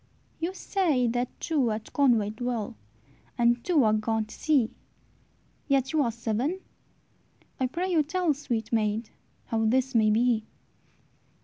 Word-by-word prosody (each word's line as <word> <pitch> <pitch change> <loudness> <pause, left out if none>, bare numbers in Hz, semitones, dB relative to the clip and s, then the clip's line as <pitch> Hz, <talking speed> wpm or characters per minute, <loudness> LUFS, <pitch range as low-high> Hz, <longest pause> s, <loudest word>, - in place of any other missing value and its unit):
"You 345 +3 -3
say 330 -14 +1
that 245 +2 0
two 285 -7 +1
at 215 0 -5
Conway 235 -7 +3
dwell, 230 -1 -3 0.6
And 240 0 +3
two 325 -7 +3
are 215 -1 +4
gone 220 0 0
to 215 - -13
sea, 280 -8 +1 1.0
Yet 270 -1 +1
ye 315 - +2
are 240 -4 +1
seven! 235 - -2 1.0
I 260 - +2
pray 360 +8 -2
you 330 -3 +4
tell, 335 +1 0
Sweet 235 -6 -4
maid, 215 0 0 0.3
how 225 -1 -1
this 260 +4 +1
may 220 -2 +4
be." 225 0 +2
245 Hz, 140 wpm, -27 LUFS, 220-290 Hz, 1.0 s, are